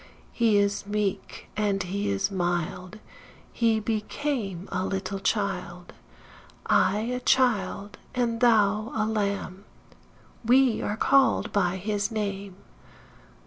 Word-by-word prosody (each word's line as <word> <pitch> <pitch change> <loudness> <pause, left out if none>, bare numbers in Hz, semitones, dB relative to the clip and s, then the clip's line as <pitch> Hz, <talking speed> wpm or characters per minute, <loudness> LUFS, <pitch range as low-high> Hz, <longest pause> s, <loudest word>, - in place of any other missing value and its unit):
He 225 -3 +3
is 200 0 0
meek, 205 -1 -3
& - - -30 0.3
he 200 +3 -2
is 195 0 0
mild; 175 +1 -2 0.6
He 225 -2 +2
became 215 - -3
a 185 -1 -1
little 195 0 -3
child. 185 -4 -2 0.7
I 195 +3 +3
a 250 +3 -2
child, 245 -5 +1
& - - -29
thou 230 -3 +2
a 215 -1 +1
lamb, 200 -3 -2 0.8
We 250 0 +4
are 210 - -2
called 275 +3 +3
by 185 -3 +1
his 205 +2 -2
name. 200 -3 -4
205 Hz, 110 wpm, -26 LUFS, 195-225 Hz, 0.8 s, We